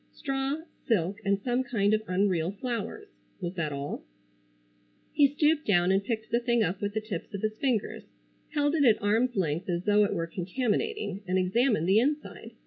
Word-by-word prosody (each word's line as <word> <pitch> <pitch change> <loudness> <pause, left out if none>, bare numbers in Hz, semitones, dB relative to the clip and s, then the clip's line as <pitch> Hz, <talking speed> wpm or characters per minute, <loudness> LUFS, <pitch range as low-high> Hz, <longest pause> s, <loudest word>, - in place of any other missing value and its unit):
Straw, 275 +2 -2 0.3
silk 200 -4 +1
and 200 0 +1
some 245 +4 0
kind 215 -5 +1
of 215 - +2
unreal 180 -3 +1
flowers. 255 - -4 0.3
Was 175 -2 -4
that 165 -5 -2
all? 140 0 -5 1.1
He 290 -2 +6
stooped 300 +2 +1
down 180 -2 +4
and 195 +1 +2
picked 220 0 -3
the 235 - +3
thing 235 -2 +2
up 185 0 -2
with 205 0 -2
the 220 - 0
tips 210 -5 -6
of 200 - -6
his 215 0 0
fingers, 250 -7 0 0.5
held 290 0 +2
it 310 -3 +3
at 230 -5 +5
arms 225 +4 +1
length 170 -1 -1
as 175 0 -1
though 210 +1 +4
it 200 - 0
were 165 -2 -1
contaminating, 205 - -2
and 185 +1 +1
examined 190 0 +2
the 195 +3 +5
inside. 290 +5 -2
210 Hz, 185 wpm, -28 LUFS, 185-255 Hz, 1.1 s, He